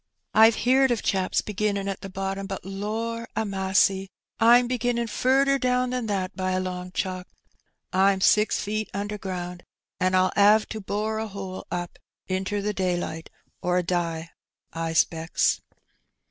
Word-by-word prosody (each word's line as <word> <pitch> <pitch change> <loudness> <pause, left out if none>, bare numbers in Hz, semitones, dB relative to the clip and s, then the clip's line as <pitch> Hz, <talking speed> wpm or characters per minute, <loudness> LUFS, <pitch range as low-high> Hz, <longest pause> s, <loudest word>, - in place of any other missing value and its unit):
^'Pve 220 +1 +7
heerd 265 +2 +3
of 240 -3 0
chaps 190 -1 +1
beginnin' 205 -1 -1
at 195 - -4
the 195 - -7
bottom, 195 +1 -4
but 195 -2 -6
lor* 220 +4 -3
a 220 - 0
massy! 190 -1 +1 0.3
Pm 240 +2 +6
beginnin' 245 -1 0
furder 270 +4 +2
down 250 0 +1
than 250 -3 -2
that 195 -1 -2
by 185 -1 -1
a 185 - +1
long 180 -1 -4
chalk. 185 -1 -3 0.7
Pm 190 +1 +4
six 210 +2 +3
feet 215 +1 -2
under 205 +1 -3
ground, 180 -2 -5 0.4
an' 185 0 +1
PU 185 0 +3
'ave 210 +1 +5
to 220 - -4
bore 215 +2 -2
a 220 - -3
hole 190 -2 -7
up 175 -1 -5 0.3
inter 190 +2 -1
the 210 +1 -1
daylight, 175 -3 -2 0.3
or 180 0 +1
die, 170 -2 -2 0.4
I 165 0 -3
'specks.'' 165 0 +1
195 Hz, 155 wpm, -25 LUFS, 185-220 Hz, 0.7 s, ^'Pve